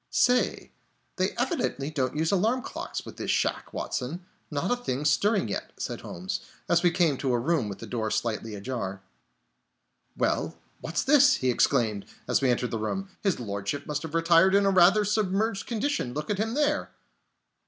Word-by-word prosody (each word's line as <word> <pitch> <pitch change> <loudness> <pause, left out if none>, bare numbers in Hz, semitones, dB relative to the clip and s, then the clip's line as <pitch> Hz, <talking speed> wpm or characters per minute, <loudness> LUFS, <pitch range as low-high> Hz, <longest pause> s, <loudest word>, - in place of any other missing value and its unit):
"Say, 250 0 +2 0.5
they - - +2
evidently 195 - -1
don't 135 -3 -1
use 160 +1 +1
alarm 225 +7 +2
clocks - - -5
in - - -10
this - - -5
shack, - - 0
Watson. 160 +8 -4 0.2
Not 150 +7 -1
a - - +4
thing 150 - -3
stirring 200 - +2
yet," 100 - -4
said - - -4
Holmes, 90 +2 -4 0.3
as 170 0 +3
we 175 - +5
came 165 -5 +2
to 135 - 0
a - - +3
room 135 -3 0
with 100 - -6
the - - -8
door 110 -2 -2
slightly 110 0 -2
ajar. 100 -3 -4 1.1
"Hello, - - 0 0.2
what's 165 - -2
this?" 285 0 +6
he 130 -1 +1
exclaimed, 115 -5 +1 0.2
as - - +2
we 135 - +3
entered 125 0 0
the 115 - -2
room. 195 - -3
"His 195 -8 +1
Lordship 100 +5 -3
must 150 -1 -2
have 160 -1 -6
retired 170 +3 +5
in 200 0 +4
a 195 - +4
rather 195 +3 +5
submerged 210 0 0
condition! 230 - -1
Look 150 +6 -3
at 200 - -1
him 225 +2 -1
there!" 295 0 +1
160 Hz, 180 wpm, -27 LUFS, 125-200 Hz, 1.1 s, this